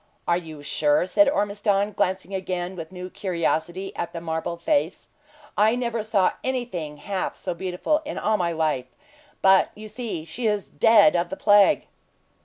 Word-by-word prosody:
"Are 170 - +3
you 160 -4 -7
sure?" 150 +2 +2
said 275 +11 +4
Ormiston, 205 -3 0
glancing 190 0 -1
again 185 -1 -3
with 165 -1 -8
new 180 0 -7
curiosity 175 0 -2
at 170 - -4
the 170 - -4
marble 165 +1 -3
face. 165 0 -1 0.5
"I 215 +3 +4
never 235 -2 -2
saw 210 -3 +2
anything 210 - -3
half 190 +4 -3
so 180 - -4
beautiful 185 - -1
in 305 - -6
all 215 0 +1
my 175 -3 0
life; 155 -6 -1 0.6
but 190 0 +5
you 215 +1 -9
see 215 -8 -5
she 225 +9 -3
is 210 -2 -1
dead 210 -3 +5
of 170 0 0
the 190 - -5
plague." 205 +7 +5
185 Hz, 165 wpm, -24 LUFS, 170-210 Hz, 0.6 s, but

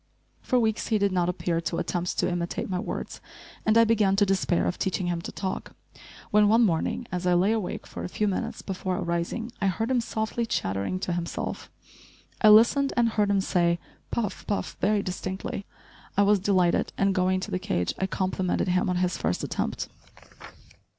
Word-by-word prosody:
For 250 - +2
weeks 220 -2 0
he 220 - +2
did 200 -1 +1
not 180 -1 +1
appear 175 -2 -1
to 170 0 -3
attempt 175 0 -2
to - - +2
imitate 175 -1 -2
my 185 -2 -2
words, - - -5 0.5
and 215 +1 +5
I 230 - +8
began 215 -4 +3
to 205 +1 +4
despair 190 -3 +1
of 180 - -2
teaching 190 -1 -1
him 175 -1 -1
to - - -6
talk, 190 -1 -4 0.6
when 210 0 +5
one 225 +3 +5
morning, 175 +6 0
as 180 0 -2
I 180 - +4
lay 185 +4 +3
awake 220 -5 -2
for - - -7
a - - -4
few 210 +3 0
minutes 195 - -3
before 185 -1 -3
arising, 170 +7 -2
I 195 - +2
heard 225 +6 -1
him 250 -2 +3
softly 225 +1 -2
chattering 100 - -1
to 180 - -1
himself. 170 -1 -4 0.7
I 215 - +7
listened 235 +6 +6
and 235 -1 +4
heard 210 -2 +1
him 200 -1 +3
say 170 -2 +2 0.3
"Puff," 210 -5 -3
"Puff," 205 - -2
very 210 -1 +2
distinctly. 190 +2 -4 0.5
I 200 - +6
was 205 0 +4
delighted 185 -3 +2
and, 195 0 +2
going 185 0 +2
to - - -5
the 185 - -1
cage, 90 - -1
I 190 - 0
complimented 185 -1 -1
him 185 +3 +2
on 180 - +1
his 180 0 0
first 90 +3 -1
attempt. - - -2
190 Hz, 190 wpm, -26 LUFS, 180-215 Hz, 0.7 s, I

